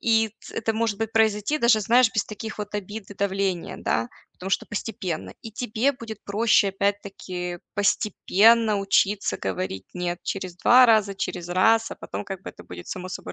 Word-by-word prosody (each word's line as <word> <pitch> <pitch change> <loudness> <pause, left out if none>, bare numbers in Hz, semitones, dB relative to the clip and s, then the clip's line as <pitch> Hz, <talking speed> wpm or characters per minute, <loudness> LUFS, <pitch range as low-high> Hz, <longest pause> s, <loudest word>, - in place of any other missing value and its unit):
И 225 -1 +3
т - - -12
это 225 0 -1
может 220 -1 0
быть 225 -1 -2
произойти 220 +5 +2
даже, 235 -5 +4
знаешь, 240 +4 +5
без 215 - +1
таких 220 +1 -7
вот 210 0 -5
обид 205 +1 -7
и - - -8
давления, 195 -2 -1
да? 115 +1 -1 0.2
Потому 185 - -8
что - - +1
постепенно. 190 -5 -5
И 225 - -7
тебе 225 +3 0
будет 225 -5 -9
проще, 205 0 +3
опять-таки, 195 -3 -3 0.2
постепенно 210 +2 +3
учиться 195 +1 +1
говорить 95 0 -4
"нет" 175 -1 -3
через 185 -2 -4
2 250 +7 +6
раза, 215 -4 +3
через 175 -2 -4
раз, 225 +5 +3
а - - -7
потом - - -6
как 195 -2 -7
бы - - -7
это - - -14
будет 85 -1 -10
само 185 0 -6
собой 185 - -7
205 Hz, 180 wpm, -24 LUFS, 185-225 Hz, 0.2 s, 2